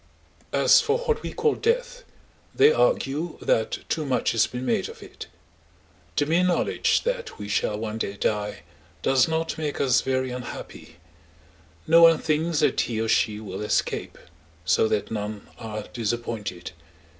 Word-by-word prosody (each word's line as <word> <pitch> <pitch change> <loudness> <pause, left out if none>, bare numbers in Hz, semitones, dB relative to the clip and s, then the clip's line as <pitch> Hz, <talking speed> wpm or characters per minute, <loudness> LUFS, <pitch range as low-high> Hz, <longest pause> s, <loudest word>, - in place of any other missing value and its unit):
As - - +5
for 445 0 +1
what 480 -2 -1
we - - -5
call 450 -1 +1
death, - - -1 0.5
they 440 +2 +6
argue 175 - 0
that 110 - -1
too 155 - -1
much 135 -3 0
has 115 -1 +2
been 125 +1 -6
made 225 - 0
of 460 +1 -11
it. - - -10 0.9
The 145 - +2
mere 165 +4 +2
knowledge 180 -1 +1
that - - -3
we 105 - -7
shall 105 0 0
one 110 0 -4
day 100 -2 -3
die 105 0 -2 0.4
does 135 +4 +4
not 160 0 -2
make 150 -2 -3
us 130 -3 +3
very 130 -1 -1
unhappy; 125 0 -8 0.9
no 165 +1 +6
one 165 -1 +8
thinks 160 +1 0
that - - +2
he 115 -2 -2
or 115 - -1
she 105 -1 +1
will 100 -3 -7
escape, 105 - -1 0.5
so 100 - +3
that 105 0 -1
none 105 -1 -5
are 110 -2 -5
disappointed. 115 -6 -4
130 Hz, 155 wpm, -25 LUFS, 110-175 Hz, 0.9 s, one